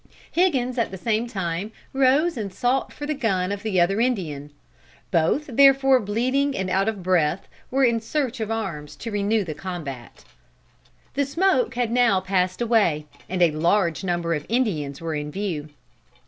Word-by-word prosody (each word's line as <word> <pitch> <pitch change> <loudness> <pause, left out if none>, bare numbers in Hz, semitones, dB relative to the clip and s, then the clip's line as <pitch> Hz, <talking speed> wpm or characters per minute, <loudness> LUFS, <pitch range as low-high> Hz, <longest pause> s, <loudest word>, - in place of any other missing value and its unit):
Higgins 260 -9 +1
at 230 - +1
the 190 - -7
same 225 +4 0
time 190 -1 -3 0.2
rose 275 +6 +3
and 210 -5 -4
sought 245 +7 0
for 290 - -7
the 305 - -1
gun 195 -9 0
of 200 0 -3
the 210 -4 0
other 195 +5 +2
Indian. 165 - -1 0.6
Both, 170 - +2
therefore, 270 0 +6
bleeding 255 +7 0
and 190 -1 -2
out 195 +3 +2
of 205 -4 -5
breath, 175 -1 +1 0.2
were 270 +1 +1
in 230 -2 +2
search 260 +1 -2
of 220 -1 -3
arms 185 -10 -4
to 230 - -6
renew 205 +1 +1
the 160 -4 -5
combat. 150 -7 -7 0.9
"The 280 - +1
smoke 380 - +1
had 240 -2 0
now 235 -5 +4
passed 185 +1 -1
away, 205 -10 +2 0.2
and 180 0 +1
a 170 - +4
large 170 +3 +1
number 175 -2 -1
of 150 -2 -2
Indians 170 - -1
were 165 -1 -3
in 150 -1 -3
view. 160 -4 -4
205 Hz, 170 wpm, -24 LUFS, 175-250 Hz, 0.9 s, therefore